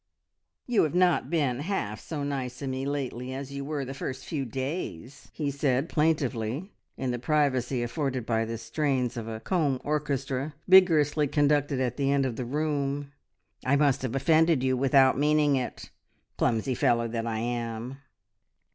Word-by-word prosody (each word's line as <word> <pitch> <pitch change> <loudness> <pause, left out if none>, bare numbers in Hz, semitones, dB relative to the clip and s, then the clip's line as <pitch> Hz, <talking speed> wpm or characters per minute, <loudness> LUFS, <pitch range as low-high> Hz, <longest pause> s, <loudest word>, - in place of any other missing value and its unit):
"You 245 -3 +3
have 155 - -3
not 180 -2 +3
been 140 -7 0
half 145 - -2
so 150 -3 -5
nice 130 -3 -3
to 140 - -6
me 130 +1 -3
lately 130 -3 -3
as 135 0 -6
you 140 0 -5
were 145 -1 -3
the 135 - -6
first 130 -1 -5
few 145 -4 -3
days," 130 - -5
he 145 -3 -2
said 140 +1 0
plaintively 150 - 0 0.3
in 130 -1 -1
the 120 - -3
privacy 130 -3 +1
afforded 130 -1 -2
by 115 -1 +1
the 115 +1 -4
strains 130 +1 -1
of 115 -2 -5
a 110 -1 -5
comb 145 0 0
orchestra 140 -1 -2
vigorously 155 -6 +5
conducted 145 -1 +2
at 125 -2 -1
the 140 -1 +1
end 140 -1 +2
of 125 -3 -2
the 125 - -4
room. 145 0 -2 0.5
"I 130 +2 +3
must 140 -2 +3
have 130 -1 -3
offended 160 0 +3
you 130 0 +2
without 135 0 +4
meaning 150 -1 +3
it; 130 -2 -4 0.4
clumsy 125 +2 +1
fellow 115 -1 +2
that 115 0 -3
I 110 -1 -2
am!" 120 +2 -3
135 Hz, 165 wpm, -27 LUFS, 125-150 Hz, 0.5 s, vigorously